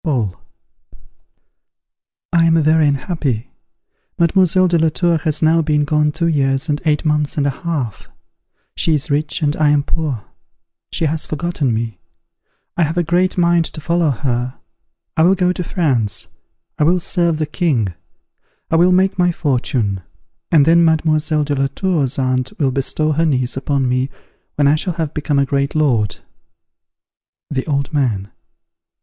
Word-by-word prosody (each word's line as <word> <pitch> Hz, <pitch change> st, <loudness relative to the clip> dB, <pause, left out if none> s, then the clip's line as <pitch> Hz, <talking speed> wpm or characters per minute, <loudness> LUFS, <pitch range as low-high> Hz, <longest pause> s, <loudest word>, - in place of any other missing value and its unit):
Paul. 120 Hz, -, -1 dB, 2.0 s
I 170 Hz, -1 st, +4 dB
am 165 Hz, 0 st, +4 dB
very 155 Hz, 0 st, +4 dB
unhappy. 140 Hz, -, -2 dB, 0.7 s
Mademoiselle 185 Hz, +2 st, +3 dB
de 170 Hz, -1 st, +2 dB
la 160 Hz, 0 st, +3 dB
Tour 170 Hz, +1 st, +1 dB
has 155 Hz, +1 st, -1 dB
now 165 Hz, +1 st, +4 dB
been 150 Hz, -1 st, +1 dB
gone 150 Hz, 0 st, +1 dB
two 165 Hz, +3 st, -2 dB
years 140 Hz, -2 st, +1 dB
and 145 Hz, +1 st, -1 dB
eight 150 Hz, -1 st, +1 dB
months 150 Hz, -1 st, 0 dB
and 145 Hz, -, +1 dB
a 140 Hz, -, +2 dB
half. 140 Hz, -, -4 dB, 0.7 s
She 160 Hz, -, +1 dB
is 150 Hz, +2 st, -3 dB
rich, 150 Hz, +3 st, -1 dB
and 145 Hz, +1 st, +1 dB
I 155 Hz, -1 st, +3 dB
am 145 Hz, -1 st, +3 dB
poor; 145 Hz, -9 st, -3 dB, 0.7 s
she 165 Hz, -, -1 dB
has 155 Hz, +1 st, +1 dB
forgotten 155 Hz, -4 st, -2 dB
me. 115 Hz, -4 st, -3 dB, 0.8 s
I -, -, 0 dB
have 165 Hz, +1 st, 0 dB
a 175 Hz, -, +2 dB
great 180 Hz, +3 st, +1 dB
mind 170 Hz, -1 st, +3 dB
to 160 Hz, -, -7 dB
follow 170 Hz, +1 st, +1 dB
her. 125 Hz, -2 st, -2 dB, 0.6 s
I -, -, +2 dB
will 180 Hz, +4 st, +5 dB
go 180 Hz, -1 st, +1 dB
to 180 Hz, -, -4 dB
France; 130 Hz, -, -1 dB, 0.5 s
I -, -, +3 dB
will 175 Hz, +4 st, +3 dB
serve 170 Hz, -2 st, 0 dB
the 155 Hz, -, -1 dB
king; 145 Hz, -, -1 dB, 0.8 s
I 165 Hz, -, +3 dB
will 175 Hz, +2 st, +4 dB
make 190 Hz, +1 st, +2 dB
my 175 Hz, 0 st, +3 dB
fortune; 125 Hz, -, -1 dB, 0.5 s
and 150 Hz, -4 st, +5 dB
then 170 Hz, +1 st, +5 dB
Mademoiselle 155 Hz, -1 st, +2 dB
de 145 Hz, 0 st, -2 dB
la 135 Hz, -1 st, +1 dB
Tour's 155 Hz, -9 st, 0 dB
aunt 130 Hz, -1 st, 0 dB
will 135 Hz, -4 st, +1 dB
bestow 140 Hz, +3 st, 0 dB
her 160 Hz, +2 st, +1 dB
niece 130 Hz, -4 st, 0 dB
upon 135 Hz, 0 st, -1 dB
me 130 Hz, +2 st, 0 dB, 0.5 s
when 145 Hz, -1 st, +2 dB
I 145 Hz, -, +5 dB
shall 180 Hz, +3 st, -2 dB
have 160 Hz, -3 st, -3 dB
become 150 Hz, -1 st, -1 dB
a 140 Hz, -, +3 dB
great 140 Hz, +1 st, -1 dB
lord. 125 Hz, -9 st, +1 dB, 1.3 s
_The 130 Hz, +1 st, -2 dB
Old 140 Hz, +2 st, -1 dB
Man. 110 Hz, -9 st, -1 dB
150 Hz, 165 wpm, -18 LUFS, 135-165 Hz, 2.0 s, will